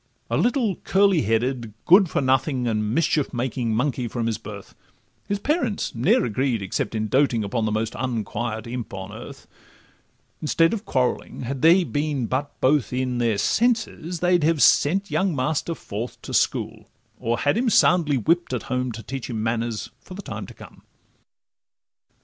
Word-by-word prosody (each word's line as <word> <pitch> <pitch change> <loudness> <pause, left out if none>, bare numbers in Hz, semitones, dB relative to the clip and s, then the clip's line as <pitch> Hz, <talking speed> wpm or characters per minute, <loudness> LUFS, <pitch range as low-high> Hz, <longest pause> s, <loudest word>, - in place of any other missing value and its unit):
A - - +2
little 240 -6 +1
curly 195 -4 +3
headed, 115 0 -1
good 185 0 +6
for - - 0
nothing, 130 -1 +1
And 105 -2 0
mischief 155 0 +1
making 120 -2 -2
monkey 125 0 0
from 115 0 -3
his 115 -1 -1
birth; 105 -3 -10 0.5
His 200 - 0
parents 250 - -1
ne'er 120 +1 +2
agreed 120 -1 -1
except 95 +4 -3
in 110 0 -1
doting 130 -2 +2
Upon 110 +3 -1
the 110 - 0
most 110 +1 -1
unquiet 115 -2 -3
imp 120 -3 -6
on 95 +1 -7
earth; 110 - -10 1.0
Instead 165 +3 +2
of 220 -1 -4
quarrelling, 130 -1 -1
had 130 +1 -4
they 170 +3 +6
been 145 -5 -1
but 135 +5 -3
both 135 -3 +2
in 125 -1 -1
Their 115 -3 +1
senses, 215 - 0
they'd 180 -2 +3
have 160 -1 +3
sent 195 +7 +3
young 190 -4 +1
master 155 +5 -1
forth 115 0 -6
To - - -7
school, - - 0 0.3
or 120 +1 -1
had 145 - +1
him 240 +2 +1
soundly 170 -8 +4
whipp'd 165 +3 +1
at 120 - -4
home, 125 0 -1
To 115 +1 -8
teach 130 +4 -6
him 110 -3 -3
manners 115 -1 -2
for 185 - -11
the 200 - -8
time - - -6
to - - -11
come. - - -14
130 Hz, 170 wpm, -23 LUFS, 115-165 Hz, 1.0 s, good